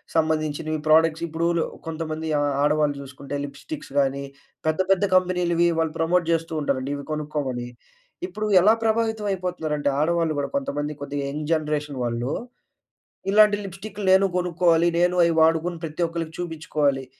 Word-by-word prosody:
సంబంధించినవి 155 -1 0
ప్రొడక్ట్స్ 160 +1 +4
ఇప్పుడూ 165 +1 -1
లు 165 - +2 0.2
కొంతమంది 160 0 -4
ఆహ్, 145 0 +1
ఆడవాళ్ళు 150 -1 +2
జూసుకుంటే 140 +1 -8
లిప్‌స్టిక్స్ 215 - -8
గాని 140 0 0 0.4
పెద్ద 155 +2 +1
పెద్ద 195 0 +3
కంపెనీ‌లువి, 180 -2 +2
వాళ్ళు 160 -1 0
ప్రమోట్ 170 +1 +2
జేస్తూ 165 0 -1
ఉంటారండి 140 -1 -1
ఇవి 140 -1 -7
కొనుక్కోమని. 145 -5 -3 0.6
ఇప్పుడు 215 - -4
ఎలా 210 +5 +6
ప్రభావితమైపోతున్నారంటే 195 -9 -1
ఆడవాళ్లు 165 0 +1
గూడా, 140 - -2
కొంతమంది 150 - -2
కొద్దిగ 145 0 -3
యంగ్ 150 +2 -5
జనరేషన్ 150 -3 -2
వాళ్ళు, 120 +2 -2 1.0
ఇలాంటి 210 0 +6
లిప్‌స్టిక్‌లు 195 +2 -7
నేనూ 190 +1 +5
కొనుక్కోవాలి, 175 -1 +3
నేను 175 +1 +3
అయి 170 -1 +1
వాడుకొని 165 +2 +2
ప్రతి 160 +2 -1
ఒక్కళ్ళకి 165 -1 -5
చూబిచ్చుకోవాలి. 150 -5 -1
160 Hz, 135 wpm, -24 LUFS, 150-175 Hz, 1.0 s, ఎలా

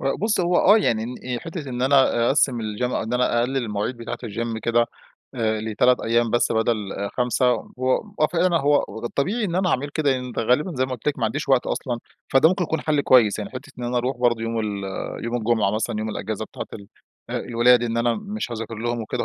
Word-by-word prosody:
لأ 135 - 0
بُصّي، 210 -3 +1
هو 175 0 +2
آه 205 +4 +6
يعني. 115 - +1
إن 125 0 -5
حتة 165 -4 -6
إن 125 0 -3
أنا 130 -3 +4
أقسم 135 -3 +2
الGym 105 +1 -4
إن 110 - -2
أنا 125 -1 +2
أقلل 130 +3 -1
المواعيد 110 0 -2
بتاعة 120 0 -6
الGym 115 +1 -3
كده. 120 0 +2 0.5
آآ، 110 -2 0
ل3 110 +3 +2
أيّام 115 0 +1
بس 120 - +2
بدل 110 -3 -1
5. 125 0 +1 0.3
هو 130 0 +2 0.2
هو 155 - +5
فعـلًا 175 0 +2
هو 145 +1 +3 0.2
ده 120 - -3
الطبيعي 200 - -1
إن 175 -4 -2
أنا 185 0 +1
اعمل 140 0 0
كده 145 -1 +1
يعني 125 -1 -2
غالبًا 125 +10 +1
زي 130 - +2
ما - - -10
قُلت 125 +3 -3
لك 145 - -2
ما 115 - 0
عنديش 140 +8 -2
وقت 130 -2 +3
أصلًا، 120 -3 -2 0.3
فده 135 +4 +5
ممكن 185 0 0
يكون 160 -2 -2
حل 150 -2 +1
كويّس 120 -7 +4
يعني. 105 - -5
حتة 135 +2 -9
إن 120 - -4
أنا 120 +1 -2
أروح 125 +3 -1
برضو 120 -2 +1
يوم 115 0 -2
ال 100 -2 -3 0.4
يوم 120 +1 -1
الجمعة 110 -3 +1
مثلًا 110 +1 -1
يوم 110 - -2
الإجازة 110 +1 -4
بتاعة - - -8
ال 100 -2 -10 0.4
الولاد. 120 +1 +3
إن 115 -1 -1
أنا 115 0 +2
مش 210 - -5
هاذاكر 115 0 -5
لهم 120 +2 -2
وكده. 110 - -3
120 Hz, 220 wpm, -23 LUFS, 115-140 Hz, 0.5 s, آه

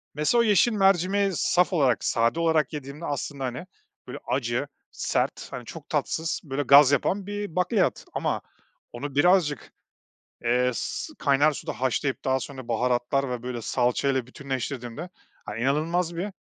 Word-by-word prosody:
Mesela, 150 +11 +2
o - - +3
yeşil 215 +2 +4
mercimeği 195 -1 +3
saf 180 +3 +2
olarak, 135 -8 +2
sade 115 +7 +1
olarak 160 -3 +2
yediğimde, 145 +2 -7
aslında, 140 -1 -4
hani, 125 +6 -5 0.4
böyle - - -7
acı, - - -1 0.2
sert, - - -2
hani, - - -7
çok - - -10
tatsız, 160 0 -1
böyle, 140 -1 -3
gaz 140 0 +7
yapan 190 +8 0
bir 205 -4 -5
bakliyat. 185 +2 +1
Ama - - -1 0.5
onu 140 +3 -6
birazcık, 160 -1 +3 0.7
eee, 125 +1 +2
s 310 - -4
kaynar 145 +2 +4
suda 145 - -5
haşlayıp 130 +1 -1
daha 130 0 +2
sonra 130 -3 -8
baharatlar 125 +3 0
ve 125 -1 -4
böyle 125 -2 -4
salçayla 125 +2 0
bütünleştirdiğimde, 130 +2 -5 0.4
hani, 105 +2 -5
inanılmaz 165 +6 0
bir, 185 +5 -3
145 Hz, 145 wpm, -26 LUFS, 130-175 Hz, 0.7 s, gaz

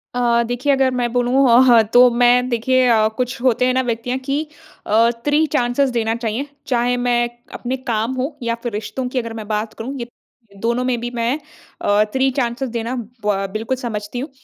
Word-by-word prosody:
अ, 235 -1 +2
देखिए, 245 +4 -1
अगर 265 -1 +2
मैं 245 -2 -1
बोलूँ 250 +2 +3
अ, 235 - +7
ह 235 -2 +7
तो 250 +1 +8
मैं 245 +1 +3
देखिए 255 +2 +2
अ, 220 -2 +4
कुछ 250 -1 -2
होते 250 -1 +2
हैं 255 - +2
ना 260 - +2
व्यक्तियाँ 245 +1 -2
कि 280 +3 0 0.4
अ, 225 +2 +4 0.2
3 295 +2 +3
चांसेस 245 +2 +1
देना 225 -2 -1
चाहिए। 235 +4 -3 0.2
चाहे 245 -1 +1
मैं 240 -1 +1 0.2
अपने 255 +2 -3
काम 225 +3 0
हो 265 +3 -3
या 230 0 0
फिर 240 - -2
रिश्तों 225 +5 -4
की 255 - -1
अगर 230 -2 -5
मैं 220 -2 -7
बात 215 +1 -2
करूँ, 245 +5 -6
ये 235 - -5 0.5
दोनों 235 +2 0
में 250 -2 0
भी 240 - -4
मैं 235 +4 0 0.4
अ, 205 +1 +3
3 265 0 +2
चांसेस 245 +1 -2
देना 235 +2 -3
ब 230 -2 -6
अ, 195 0 -1
बिल्कुल 225 +4 -2
समझती 230 -2 -5
हूँ। 275 - -5
245 Hz, 205 wpm, -19 LUFS, 230-255 Hz, 0.5 s, तो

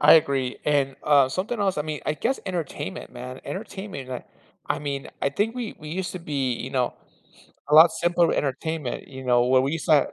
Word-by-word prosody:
I - - +9
agree, 135 -5 +2
and, 140 -2 +1
uh, 140 -3 +5
something 195 - -2
else. 195 -4 +1
I 150 - +1
mean, 155 -1 -4
I 155 - +1
guess 260 - -1
entertainment, 165 - -4
man, 125 +1 -8
entertainment, 190 - -6
like, 125 -1 -6 0.4
I - - 0
mean, 140 -2 -4
I - - +2
think 210 +9 -1
we 240 -4 -4
we 150 - -9
used 180 +3 -3
to 185 - -5
be, 140 -6 -1
you 125 +3 -5
know 125 -3 0 0.7
a 150 - +3
lot 160 +2 +10
simpler 170 +1 +2
entertainment. 145 0 -2
You 130 -1 -9
know, 120 -1 +4
where 130 0 +5
we 140 +3 0
used 165 - -3
to 150 -3 +4
150 Hz, 210 wpm, -25 LUFS, 130-175 Hz, 0.7 s, lot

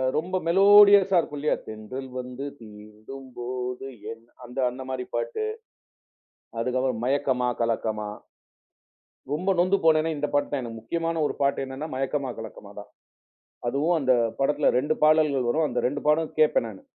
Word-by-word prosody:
ரொம்ப 185 +4 -1
மெலோடியஸ்ஸா 200 0 +7
இருக்கும் 150 -3 -4
இல்லியா, 150 +2 +1
தென்றல் 110 +5 -7
வந்து 125 +2 -6
தீண்டும் 110 +4 -12
போது 125 +1 -4 0.3
என், 115 0 -11 0.2
அந்த 125 +2 -7
அந்த 130 +2 -8
மாரி 130 -1 -3
பாட்டு. 455 -3 -2 1.1
அதுக்கு 125 +2 0
அப்புறம், 130 -3 -1
மயக்கமா 130 -1 +1
கலக்கமா. 110 -2 -1 1.2
ரொம்ப 185 +6 +1
நொந்து 185 +3 +3
போனேனா, 160 0 +4
இந்த 150 +1 -1
பாட்டு 145 - +1
தான் 145 -2 -1
எனக்கு. 115 -1 -7
முக்கியமான 165 +6 -2
ஒரு - - -5
பாட்டு 140 0 +1
என்னென்னா, 135 +4 -6
மயக்கமா 135 0 -2
கலக்கமா 110 -3 -9
தான். - - -11 0.8
அதுவும் 150 +7 +1
அந்த 130 -2 +3 0.3
படத்துல 145 +2 +2
2 150 +4 0
பாடல்கள் 155 -5 +3
வரும். 155 +5 +1
அந்த - - -1
2 145 +2 -4
பாடல் 155 +1 +2
கேப்பேன் 155 -6 +3
நானு. 100 -3 -11
135 Hz, 150 wpm, -25 LUFS, 125-155 Hz, 1.2 s, மெலோடியஸ்ஸா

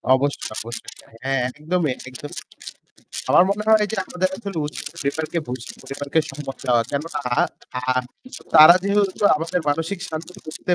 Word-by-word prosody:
অবশ্যই, 140 +2 -1
অবশ্যই। 115 +1 -5 0.3
হ্যাঁ 135 -1 +1
একদমই, 155 +3 -1 0.2
একদমই। 130 +3 -7 0.9
আমার - - +8
মনে 205 +1 0
হয় 215 -1 +6
যে 220 - -3
আমাদের 185 +1 -1
আসলে 200 -4 -6
উচিত 150 - -7
পরিবারকে 160 +2 -2
বুঝ 125 -1 -4 0.2
পরিবারকে 140 +3 -1
সময় 135 -1 -6
দেওয়া। 120 -2 +3
কেননা 150 +1 -3 0.2
আহ 130 0 -1 0.5
তারা 155 +2 +10
যেহেতু 200 +1 +3 0.3
আমাদের 165 +3 -1
মানসিক 165 +5 -1
শান্তি 160 +2 -6
বুঝতে 155 +3 -4
155 Hz, 140 wpm, -22 LUFS, 135-180 Hz, 0.9 s, তারা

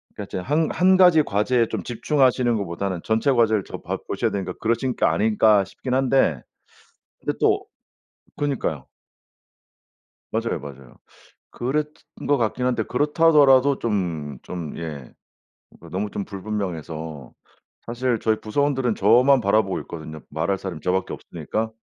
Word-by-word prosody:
그러니까 - - -5
이제 - - -6
'한 150 - 0
한 185 +1 +4
가지 180 -5 +6
과제에 115 +3 +1
좀 - - -4
집중하시는 125 0 +1
것보다는 95 -2 -3
전체 115 +5 +1
과제를 110 -4 +3
저 - - -8
봐 - - -3
보셔야 - - -1
되니까 95 -2 -3
그러신 120 +3 0
게 - - +1
아닐까.' 105 -1 +3
싶긴 125 +6 -6
한데. 130 - +2 0.8
근데 - - -3
또 - - +2 0.7
그니까요. 130 - -2 1.5
맞아요, - - -1
맞아요. 70 -3 -11 0.6
그랬던 150 +5 -4
것 145 - +4
같긴 120 +2 -1
한데 120 -4 +1
그렇다 150 +5 +1
하더라도 140 -3 +5
좀, 85 - -2
좀 85 -4 -6
예 75 -6 -7 0.7
그 85 - -12
너무 100 +4 -2
좀 100 - -4
불분명해서 80 - -5 0.5
사실 120 0 -1
저희 110 0 0
부서원들은 130 0 0
저만 125 +6 +5
바라보고 100 -2 +1
있거든요, 80 -2 -8
말할 80 +6 -1
사람이 95 -5 -6
저 90 - 0
밖에 95 0 -1
없으니까. 110 +1 -4
110 Hz, 325 characters per minute, -23 LUFS, 90-130 Hz, 1.5 s, 가지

